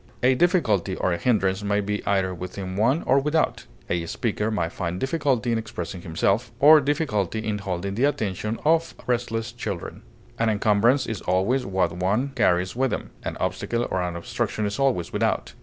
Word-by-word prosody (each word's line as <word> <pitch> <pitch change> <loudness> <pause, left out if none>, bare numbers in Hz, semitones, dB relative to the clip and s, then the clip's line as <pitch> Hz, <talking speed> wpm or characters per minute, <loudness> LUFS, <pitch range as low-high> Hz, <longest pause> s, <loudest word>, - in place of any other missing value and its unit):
A 130 +1 +5
difficulty 125 - +2
or 90 - 0
a - - -1
hindrance 100 -3 +1
may 100 0 +1
be 105 0 -2
either 95 -2 +1
within 95 +1 -6
one 120 - +2
or 135 - +4
without; 150 +3 0 0.2
a 85 -1 -1
speaker 105 +2 -1
may 90 -7 0
find 85 +1 -4
difficulty 135 -4 0
in 115 - +1
expressing 90 -4 -6
himself, 100 +8 0
or 150 +2 +8
difficulty 130 - 0
in 105 -1 -1
holding 95 0 -3
the 120 +7 +2
attention 110 -6 -1
of 165 +1 +2
restless 120 -2 -1
children. 110 -6 -5 0.4
An 115 0 +2
encumbrance 110 +5 +3
is 110 -5 -4
always 95 +9 +1
what 95 -3 +1
one 100 +10 0
carries 90 -7 +1
with 130 +1 +1
him; - - -4
an - - -5
obstacle 120 0 -1
or 95 - 0
an 90 -1 -3
obstruction 95 +4 -2
is 105 +3 -3
always 130 -11 +1
without. - - 0
105 Hz, 175 wpm, -24 LUFS, 95-125 Hz, 0.4 s, or